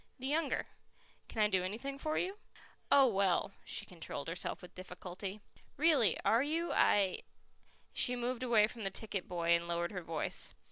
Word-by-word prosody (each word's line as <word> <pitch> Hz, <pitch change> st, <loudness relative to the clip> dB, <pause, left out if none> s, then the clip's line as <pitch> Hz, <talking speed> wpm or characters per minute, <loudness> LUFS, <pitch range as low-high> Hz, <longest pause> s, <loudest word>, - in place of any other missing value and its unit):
"The 260 Hz, -, -7 dB
younger. 310 Hz, +4 st, 0 dB, 0.6 s
Can 220 Hz, -, 0 dB
I -, -, +5 dB
do 190 Hz, -3 st, +1 dB
anything 240 Hz, +9 st, -4 dB
for 310 Hz, +1 st, -1 dB
you?" 385 Hz, +3 st, -2 dB, 0.5 s
"Oh, 275 Hz, -1 st, +8 dB
well" 195 Hz, -5 st, +2 dB
she -, -, -1 dB
controlled 165 Hz, -4 st, -6 dB
herself 180 Hz, +2 st, -4 dB
with 180 Hz, -, -11 dB
difficulty. 185 Hz, +2 st, -7 dB, 0.4 s
"Really. 295 Hz, -7 st, +4 dB
Are 230 Hz, +2 st, +5 dB
you? 325 Hz, +4 st, 0 dB
I 195 Hz, -3 st, +4 dB, 0.4 s
" -, -, -39 dB, 0.3 s
She 250 Hz, -, +3 dB
moved 245 Hz, 0 st, -2 dB
away 235 Hz, -4 st, +5 dB
from 225 Hz, +1 st, -8 dB
the 195 Hz, -, -1 dB
ticket 195 Hz, -1 st, -4 dB
boy 170 Hz, -1 st, -2 dB
and 170 Hz, 0 st, +3 dB
lowered 170 Hz, 0 st, -1 dB
her 185 Hz, -3 st, -4 dB
voice. 165 Hz, -1 st, -2 dB
210 Hz, 175 wpm, -34 LUFS, 180-255 Hz, 0.6 s, Oh